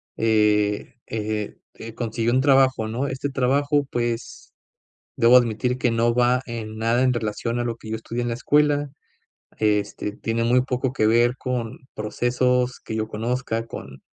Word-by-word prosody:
eh, 105 -2 +2
eh, 110 -1 -3 0.2
eh, 115 0 -9
conseguí 115 0 -2
un 130 +2 +3
trabajo, 135 -5 +3
¿no?, 125 +6 -2
este 135 +2 -3
trabajo 140 +2 +1
pues, 120 -1 -3 0.6
debo 115 +2 +6
admitir 125 +1 +2
que 125 - +2
no 115 +1 +2
va 125 +1 +3
en 110 -2 -6
nada 115 +3 +1
en 130 - +3
relación 115 +1 -2
a 120 - 0
lo 120 -1 -2
que 110 - -11
yo 110 - -2
estudié 115 +2 -4
en 120 - -2
la 115 - -1
escuela, 145 +2 +2 0.7
este, 105 -1 0
tiene 115 +2 -2
muy 125 +2 +4
poco 130 0 -2
que 110 -5 +2
ver 120 +2 +3
con 125 -3 -3 0.2
procesos 125 +3 0
que 110 - -6
yo 110 0 -1
conozca 115 +1 -2
con, 65 - -10
120 Hz, 165 wpm, -23 LUFS, 110-125 Hz, 0.7 s, debo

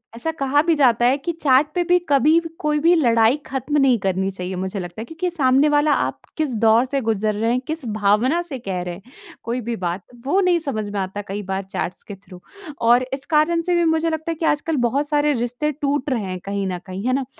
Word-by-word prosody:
ऐसा 320 +8 -3
कहा 285 -1 +1
भी 330 0 +2
जाता 240 -5 +3
है 260 +3 +3
कि 300 +5 -3
चैट 290 -3 +3
पे 355 - +2
भी 355 +1 +3
कभी 300 +4 +4
व 330 -1 -7
कोई 300 0 0
भी 335 +3 +4
लड़ाई 235 -4 +4
ख़त्म 275 +3 -2
नहीं 255 -3 +4
करनी 190 0 -1
चाहिए 185 0 -5
मुझे 190 +2 -4
लगता 175 +4 -7
है, - - -6
क्योंकि 330 +6 -3
सामने 280 -2 +3
वाला 295 0 +3
आप - - 0 0.2
किस 300 -5 -1
दौर 225 +3 +5
से 275 +1 -2
गुज़र 215 -1 0
रहे 225 +2 0
हैं, 250 - +1
किस 315 -4 -3
भावना 215 +9 +1
से 310 -7 -6
कह 190 -5 -4
रहे 175 -1 -5
हैं, 180 - -11 0.4
कोई 240 +2 -3
भी 235 +1 -3
बात, 180 -1 -3 0.2
वो 345 +8 +2
नहीं 355 -2 +3
समझ 220 -9 -3
में 205 -1 -3
आता 195 +2 -4
कई 200 +2 -4
बार 190 +1 -2
चैट्स 185 -1 -5
के 205 - -9
थ्रू। 185 -2 -15 0.4
और 240 +2 +4
इस 270 +1 -4
कारण 335 +2 +3
से 355 +1 0
भी 345 - +2
मुझे 330 +1 0
लगता 320 +1 -3
है - - -3
कि 320 - -3
आजकल 305 +1 0
बहुत 285 +3 -1
सारे 295 0 +2
रिश्ते 245 +6 -2
टूट 285 0 -2
रहे 235 -6 -1
हैं 185 -1 -5
कहीं 200 -1 -2
न 180 -1 -3
कहीं, 190 +4 -6
है 255 - +2
ना? 270 0 0
255 Hz, 245 wpm, -21 LUFS, 205-300 Hz, 0.4 s, दौर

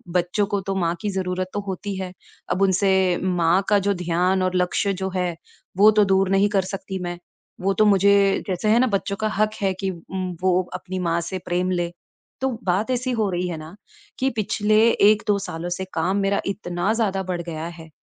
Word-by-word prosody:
बच्चों 180 +4 +1
को 200 -1 -1
तो 195 - -1
माँ 170 -2 0
की 210 - -1
ज़रूरत 185 -1 -2
तो 205 - -1
होती 195 +1 -4
है। 190 -1 -4 0.4
अब 190 - 0
उनसे 190 -1 +3
माँ 180 0 +2
का 205 - +5
जो 200 +1 +1
ध्यान 180 +1 +1
और 185 0 0
लक्ष्य 180 +2 +1
जो 190 0 -3
है 180 -2 -1 0.4
वो 210 +2 +8
तो 210 -1 +4
दूर 195 -1 +2
नहीं 195 +1 +3
कर 200 -2 +2
सकती 195 0 -5
मैं, 175 0 -4 0.4
वो 195 +1 +1
तो 215 +3 +3
मुझे 200 0 +4
जैसे 195 +3 -1
है 230 - +5
ना, 255 - +4
बच्चों 200 -2 -1
का 215 - +2
हक 215 +1 +2
है 195 -1 +1
कि 195 - 0
उम, 185 +1 -5
वो 185 0 +3
अपनी 185 0 -5
माँ 170 -1 0
से 185 +2 -4
प्रेम 180 +1 0
लें। 175 -1 -1 0.5
तो 265 - +1
बात 195 +7 0
ऐसी 255 +1 -1
हो 220 -4 0
रही 180 0 -1
है 165 - -4
न 160 - -11 0.5
कि 265 - +2
पिछले 215 0 +1 0.2
1-2 210 -1 +3
सालों 175 -2 -5
से 185 +2 -3
काम 180 +4 0
मेरा 200 0 +1
इतना 190 0 -1
ज़्यादा 200 -4 0
बढ़ 180 -2 -3
गया 165 -1 -5
है 160 0 -11
190 Hz, 210 wpm, -23 LUFS, 180-200 Hz, 0.5 s, वो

